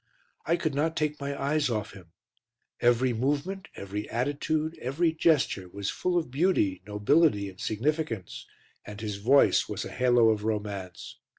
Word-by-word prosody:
I 170 - +3
could 155 -4 -2
not 160 +4 0
take 150 -1 -1
my 140 0 -4
eyes 145 0 +1
off 110 -4 -3
him; 95 -3 -13 0.7
every 120 +1 +3
movement, 145 - -2
every 100 +2 -5
attitude, 150 +5 -1
every 160 +6 0
gesture 150 - +1
was 100 +2 -3
full 180 -1 -1
of 160 -7 -2
beauty, 135 - +1
nobility 105 +1 +2
and 95 -1 -15
significance, 120 - -2 0.4
and 105 0 -9
his 105 -2 -4
voice 130 +8 +4
was - - -4
a - - -7
halo 120 -2 +4
of 105 -1 -2
romance. 105 -5 -4
125 Hz, 155 wpm, -28 LUFS, 105-155 Hz, 0.7 s, voice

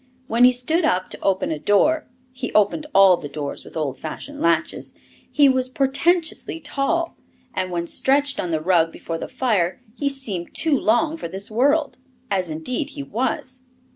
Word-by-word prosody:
When 240 +1 +4
he 250 - +7
stood 285 +8 0
up 185 -12 +1
to - - -5
open 190 -3 0
a 155 - -3
door 250 - +2 0.2
he 255 -1 -5
opened 215 +9 +2
all 195 -5 +6
the 145 - -7
doors 145 -1 -5
with - - -10
old 150 -4 -2
fashioned 285 - -7
latches 165 -1 0 0.4
he 290 -2 +5
was 260 -1 +2
portentously 315 +6 0
tall, 330 +3 -1 0.4
and 185 0 -2
when 170 -1 -2
stretched 280 +8 +1
on 180 - -2
the 160 -2 -1
rug 165 -1 +3
before 165 0 -6
the - - -5
fire 215 -9 0
he 280 +3 -1
seemed 220 -11 -3
too 320 -3 +2
long 275 +7 +1
for 315 - -5
this 190 +5 -5
world 285 +5 +1 0.3
as 185 -3 0
indeed 245 - -2
he 285 - -3
was. 255 +2 -3
245 Hz, 175 wpm, -22 LUFS, 180-285 Hz, 0.4 s, he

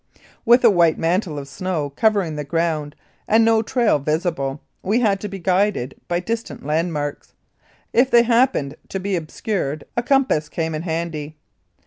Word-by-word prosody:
With 240 +2 +6
a 230 - +8
white 170 -4 +3
mantle 170 -1 0
of 140 -1 -6
snow 150 +1 -3
covering 195 -1 +1
the 150 - -3
ground, 155 -1 -1 0.3
and 225 +1 +4
no 225 -1 +4
trail 225 - +1
visible, 150 -2 -1 0.2
we 210 +6 +1
had 205 -5 +2
to 210 - -5
be 195 -1 -6
guided 185 -7 0
by 175 0 0
distant 225 -5 -5
landmarks. 150 -1 -2 0.6
If 255 +2 +4
they 235 -2 +6
happened 230 - +2
to 195 - -3
be 195 +1 -1
obscured 155 -2 -3
a 240 - +1
compass 250 - +1
came 160 -1 -2
in 155 - -3
handy. 160 -3 -4
175 Hz, 160 wpm, -21 LUFS, 150-215 Hz, 0.6 s, a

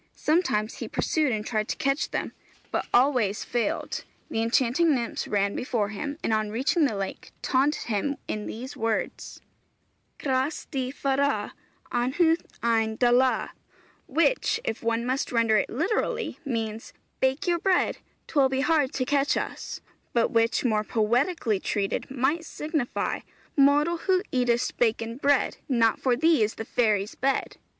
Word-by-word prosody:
Sometimes 250 - +1
he - - -5
pursued 305 -4 0
and 215 -2 -2
tried 215 -2 -1
to - - -2
catch 275 +2 0
them, - - -3 0.4
but - - -1
always 245 -6 +3
failed; 240 -3 -2 0.3
the 225 - 0
enchanting 260 +7 +3
nymphs 235 -2 -3
ran 200 -1 +1
before 230 -5 -1
him 285 +8 -5
and 225 - +1
on 215 -1 +1
reaching 270 +9 +2
the 235 -7 0
lake 195 -1 -5
taunted 275 +3 +2
him 235 +6 -1
in 210 -1 -3
these 255 +4 -6
words: 225 -1 -3 0.8
Cras 265 +2 -1
dy 260 -3 -1
fara, 275 +1 0 0.4
Anhawdd 300 +8 +2 0.2
ein 225 -1 +2
dala; 250 +2 +3 0.6
which, 335 - +2
if 220 - -3
one 230 +1 0
must 260 +2 -1
render 230 -2 +3
it - - 0
literally, 355 - -1
means: 225 -5 -4 0.3
Bake 265 +8 +1
your 345 -1 +1
bread, 370 +1 +1 0.3
'Twill 280 -4 +3
be 265 0 0
hard 295 -2 +2
to 255 - -1
catch 280 +1 +2
us; - - -5 0.3
but 235 -1 +2
which, 230 +2 +2
more 215 -3 +2
poetically 230 - +1
treated, 200 0 -2
might 275 +5 0
signify: 305 -5 -2 0.4
Mortal, 290 +4 +4
who 370 +2 +1
eatest 245 -1 +1
baken 230 0 +1
bread, 285 -1 +2
Not 230 -4 +3
for 255 -2 +2
thee 320 +1 +3
is 215 +1 +1
the 225 - -5
fairy's 215 -4 +1
bed! 270 +1 -1
255 Hz, 150 wpm, -26 LUFS, 225-285 Hz, 0.8 s, Mortal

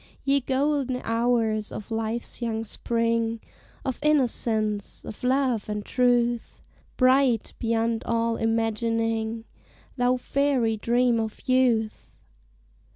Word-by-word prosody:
Ye 280 0 +3
golden 265 -1 0
hours 225 -2 0
of 215 - -8
Life's 225 +2 -3
young 225 -1 -2
spring, 230 0 -1 0.5
Of 260 -2 -2
innocence, 225 -8 0
of 215 - -9
love 255 -4 +1
and 210 -1 -3
truth! 240 -2 +1 0.4
Bright, 255 -3 +3
beyond 230 0 0
all 230 0 +1
imagining, 225 0 -1 0.5
Thou 250 0 +2
fairy 260 -4 +1
dream 240 +2 +2
of 220 -1 -5
youth! 245 -4 +2
230 Hz, 100 wpm, -25 LUFS, 225-250 Hz, 0.5 s, Ye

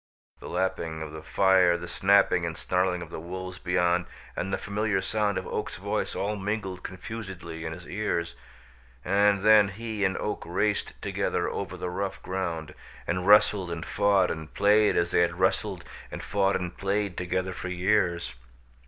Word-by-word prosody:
The - - -9
lapping 85 -3 -2
of 75 - -7
the 80 0 -8
fire, 95 -1 +4
the 85 0 -7
snapping 90 0 +3
and 85 0 -3
snarling 90 -1 0
of - - -12
the - - -5
wolves 90 +2 -6
beyond 90 -1 +1 0.3
and 95 - -3
the - - +1
familiar 105 -1 -1
sound 100 +1 0
of 95 - -3
Oak's - - -3
voice - - -2
all 105 +2 -1
mingled 95 -2 -3
confusedly 90 -4 -7
in 80 - -3
his 90 +1 -10
ears, 85 -5 -2 0.7
and 100 +1 +3
then 105 -1 +7
he 110 +1 -4
and 95 -1 +1
Oak 105 - -3
raced 100 +4 -1
together - - -1
over - - -4
the 90 - -4
rough 95 +1 -3
ground, 85 -4 -3 0.3
and 90 +1 -1
wrestled 105 -3 +5
and 85 -1 -4
fought 100 -2 +3
and 80 -1 -6
played 105 +1 +4
as 85 0 +1
they - - +4
had 85 +1 0
wrestled 95 -1 0 0.2
and - - -7
fought 100 -1 +1
and 90 -1 -3
played 100 -1 -1
together 95 +1 -2
for 90 - -6
years. 90 -2 +1
95 Hz, 170 wpm, -27 LUFS, 85-100 Hz, 0.7 s, then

